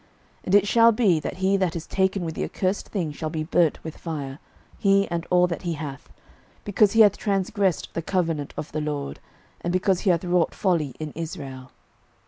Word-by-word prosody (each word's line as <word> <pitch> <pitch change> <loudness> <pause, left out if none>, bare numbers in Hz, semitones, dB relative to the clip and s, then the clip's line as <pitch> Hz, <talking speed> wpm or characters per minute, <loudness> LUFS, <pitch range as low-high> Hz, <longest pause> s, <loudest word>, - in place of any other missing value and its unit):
06:007:015 - - -33 0.4
And 190 - +2
it 205 0 +5
shall 230 +2 +6
be, 210 -8 +3
that 180 - -5
he 190 +1 +2
that 185 -3 0
is 170 - -4
taken 190 -1 0
with 160 - -3
the - - -3
accursed 190 +1 -2
thing 175 -7 -2
shall 155 +2 -4
be 155 -1 -3
burnt 165 0 +1
with 160 -1 -7
fire, 145 -4 -5 0.4
he 195 0 +3
and 170 0 -2
all 180 0 +5
that 170 -2 -4
he 170 -2 -2
hath: 145 -3 -7 0.5
because 205 0 +3
he 225 - +6
hath 205 -2 +5
transgressed 195 -2 0
the 165 - -2
covenant 165 -5 -1
of 155 - -5
the 155 - -2
LORD, 145 -2 -4 0.4
and 175 - -1
because 185 0 +2
he 195 - 0
hath 175 0 +2
wrought 175 -1 +1
folly 160 -9 0
in 155 -1 -5
Israel. 140 -5 -7
175 Hz, 205 wpm, -24 LUFS, 155-195 Hz, 0.5 s, shall